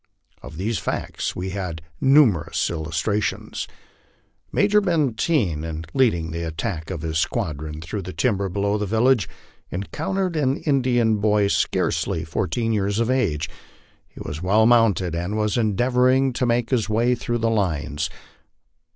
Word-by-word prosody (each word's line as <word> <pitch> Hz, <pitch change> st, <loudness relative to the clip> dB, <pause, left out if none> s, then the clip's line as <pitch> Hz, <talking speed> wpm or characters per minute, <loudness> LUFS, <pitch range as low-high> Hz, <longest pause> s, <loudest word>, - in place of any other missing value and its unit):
Of 75 Hz, +5 st, -10 dB
these 105 Hz, +5 st, -1 dB
facts -, -, -3 dB
we 95 Hz, +1 st, -4 dB
had 90 Hz, -5 st, -4 dB, 0.2 s
numer 135 Hz, -, +5 dB
ous -, -, 0 dB
illustrations. 85 Hz, +6 st, -2 dB, 0.8 s
Major 210 Hz, +1 st, +3 dB
Benteen, 140 Hz, -, +1 dB
in 80 Hz, 0 st, -5 dB
leading 85 Hz, -12 st, +2 dB
the 85 Hz, +1 st, -4 dB
attack 80 Hz, 0 st, -4 dB
of 85 Hz, -5 st, -5 dB
his 80 Hz, 0 st, -1 dB
squadron 80 Hz, -, -2 dB
through 100 Hz, +5 st, -4 dB
the 95 Hz, 0 st, -7 dB
timber 100 Hz, -3 st, 0 dB
below 100 Hz, +3 st, 0 dB
the 105 Hz, -, -2 dB
village, 115 Hz, +1 st, +2 dB, 0.4 s
encountered 170 Hz, -, -2 dB
an 140 Hz, -2 st, +1 dB
Indian 125 Hz, -6 st, +2 dB
boy, 105 Hz, -1 st, +2 dB
scarcely 80 Hz, -4 st, 0 dB
fourteen 95 Hz, +8 st, -1 dB
years 100 Hz, -1 st, 0 dB
of 115 Hz, +2 st, +1 dB
age; 90 Hz, -, 0 dB, 0.6 s
he -, -, -15 dB
was 75 Hz, +3 st, -6 dB
well 105 Hz, +5 st, +3 dB
mounted, 110 Hz, -7 st, +3 dB
and 90 Hz, +5 st, -2 dB
was 105 Hz, -1 st, 0 dB
endeavoring 125 Hz, +4 st, +2 dB
to 125 Hz, +1 st, 0 dB
make 120 Hz, 0 st, +1 dB
his 115 Hz, -4 st, +1 dB
way 115 Hz, +3 st, +2 dB
through 120 Hz, -1 st, -2 dB
the 115 Hz, 0 st, +1 dB
lines. 80 Hz, -7 st, -1 dB
105 Hz, 145 wpm, -23 LUFS, 85-120 Hz, 0.8 s, numer